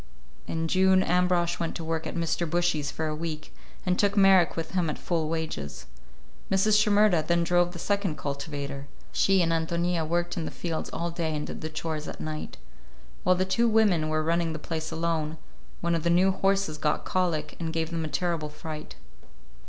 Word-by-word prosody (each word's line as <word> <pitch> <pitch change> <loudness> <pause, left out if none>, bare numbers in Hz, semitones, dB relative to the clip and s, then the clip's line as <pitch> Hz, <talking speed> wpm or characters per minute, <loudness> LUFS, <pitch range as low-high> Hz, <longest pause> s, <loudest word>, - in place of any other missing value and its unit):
In 165 0 -1
June 190 +2 +4
Ambrosch 180 -1 +2
went 165 - -2
to 165 - -4
work 160 0 -2
at - - -5
Mr. 170 0 -1
Bushy's 175 -3 +1
for 160 - -3
a 155 -1 -2
week, 155 -1 -5 0.3
and 180 -1 +1
took 205 0 +2
Marek 195 -3 +6
with 165 -1 -3
him 180 -4 +1
at 150 - -3
full 165 -3 -1
wages. 160 - -4 0.6
Mrs. 210 +2 +4
Shimerda 210 -5 +4
then 170 0 +3
drove 175 +1 +2
the 175 - -8
second 200 -3 -1
cultivator; 140 -1 -5 0.2
she 195 -2 +3
and 165 - +1
Ántonia 170 0 0
worked 175 +1 0
in 165 - -2
the - - -3
fields 165 -2 -4
all 170 0 -2
day 165 -2 -2
and 150 - -2
did - - -7
the 155 - -4
chores 155 -1 -4
at - - -7
night. 155 0 -5 0.6
While 185 - +4
the 185 +1 +1
two 230 +5 +2
women 200 -8 +3
were 155 0 +1
running 165 0 +1
the - - -3
place 160 +1 -4
alone, 160 -1 -1 0.4
one 170 0 +1
of 165 - +1
the 170 - +1
new 180 +3 +4
horses 195 -5 0
got 150 - 0
colic 165 -5 -1
and 165 -1 -2
gave 165 0 -2
them 165 -1 -2
a - - -2
terrible 165 -1 -1
fright. 155 0 -8
165 Hz, 195 wpm, -27 LUFS, 155-180 Hz, 0.6 s, Marek